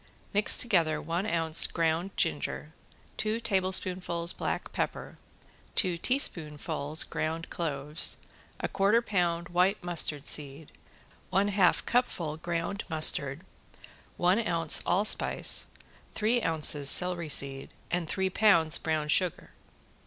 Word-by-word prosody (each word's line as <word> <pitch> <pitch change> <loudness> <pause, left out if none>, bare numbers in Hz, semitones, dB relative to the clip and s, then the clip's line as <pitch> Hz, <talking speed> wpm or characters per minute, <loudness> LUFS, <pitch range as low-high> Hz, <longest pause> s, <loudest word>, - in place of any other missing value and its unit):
Mix 205 +1 +5
together 170 -10 +1
one 170 +6 -3
ounce 165 -4 +2
ground 165 +2 -1
ginger, - - -2 0.4
two 215 +1 -2
tablespoonfuls 185 -4 +1
black - - -4
pepper, - - -5 0.6
two 180 -4 +2
teaspoonfuls 155 - -1
ground 160 +1 -4
cloves, 150 -1 -2 0.4
a - - -2
quarter 200 +4 +1
pound 175 -5 -1
white 180 +3 +1
mustard 155 -4 -2
seed, 145 +1 -1 0.6
one 195 +2 +1
half 195 -2 +2
cupful 175 -11 -1
ground 170 +4 -4
mustard, 155 -1 +3 0.7
one 180 +4 +2
ounce 165 -2 +2
allspice, 205 +3 +2 0.5
three 230 +3 +1
ounces 150 -5 +2
celery 175 -2 +2
seed 135 -1 -1 0.2
and 170 -2 -2
three 190 -1 -1
pounds 175 -7 +3
brown 155 -2 -2
sugar. 175 +3 -1
170 Hz, 110 wpm, -28 LUFS, 155-190 Hz, 0.7 s, Mix